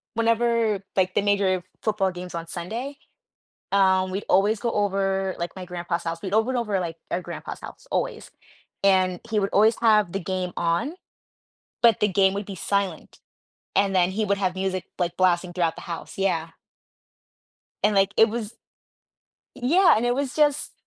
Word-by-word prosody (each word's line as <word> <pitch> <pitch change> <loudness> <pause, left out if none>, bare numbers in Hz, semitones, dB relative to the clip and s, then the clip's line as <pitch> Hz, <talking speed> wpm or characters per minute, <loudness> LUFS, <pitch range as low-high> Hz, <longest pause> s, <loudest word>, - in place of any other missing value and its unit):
whenever, 230 -2 +1
like, 185 -1 +2
the 205 - +3
major 195 -3 +1 0.2
football 210 -3 +1
games 180 -1 -8
on 165 0 -5
Sunday, 225 +12 -5 0.8
um, 190 -1 +3
we'd 195 +2 -3
always 205 +3 +3
go 235 -1 -1
over, 195 -2 0
like, 170 0 -4
my 185 - -6
grandpa's 175 -1 -4
house, 165 0 -4
we 190 - -4
all 220 +1 +4
went 260 0 -2
over, 210 -5 0
like, 165 -2 -4
our 180 - -1
grandpa's - - -7
house, - - -11
always, - - -2 0.5
and 185 -2 +3
he 215 -2 +2
would 195 - -1
always 215 +2 +4
have 215 -5 +4
the 195 - -2
game 185 0 -3
on, 170 - 0 0.9
but 230 -4 +5
the 210 - +4
game 190 0 +3
would 200 0 -4
be 195 - -6
silent, 195 -3 -2 0.6
and 195 -1 +3
then 180 0 +3
he 215 +2 0
would 200 0 0
have 185 -2 0
music, 185 -1 -2
like, 175 -1 -1
blasting 180 -1 +2
throughout 170 -2 0
the - - -9
house, 170 -2 -7
yeah. 165 -4 0 1.3
And, 210 -1 +3
like, 195 +1 +3
it 225 0 +6
was 230 0 -5 1.0
yeah, 335 +9 +5
and 230 - 0
it 245 - +2
was 275 0 -2
just 295 -2 +2
195 Hz, 175 wpm, -24 LUFS, 180-215 Hz, 1.3 s, it